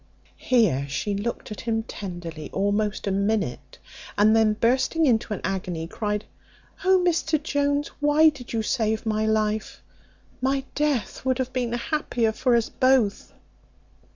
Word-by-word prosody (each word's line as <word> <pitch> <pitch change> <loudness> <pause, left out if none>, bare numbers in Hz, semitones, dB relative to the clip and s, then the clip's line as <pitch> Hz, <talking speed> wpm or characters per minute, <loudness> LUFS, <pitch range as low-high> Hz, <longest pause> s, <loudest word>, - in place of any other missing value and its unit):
Here 205 - +2
she 175 +9 -2
looked 215 +3 -4
at 210 - -6
him 225 -1 -1
tenderly 175 -8 -7
almost 205 +2 0
a 200 - 0
minute, 200 - -1 0.4
and 215 +2 +5
then 220 -1 +4
bursting 260 +8 +2
into 235 -4 +2
an 210 - -3
agony, 180 -4 -3
cried, 210 +4 -3 0.6
"Oh, 375 -1 +4
Mr 320 -2 +1
Jones, 285 -1 0
why 295 +2 +5
did 270 -5 -10
you 225 -1 -1
save 220 0 0
my 215 0 0
life? 215 0 -1 0.6
my 270 +1 +1
death 285 -8 -1
would 260 -1 +1
have 260 -1 -3
been 245 -2 -1
happier 240 -3 0
for 245 +2 +1
us 230 -1 +2
both." 255 -6 +1
225 Hz, 145 wpm, -25 LUFS, 205-265 Hz, 0.6 s, and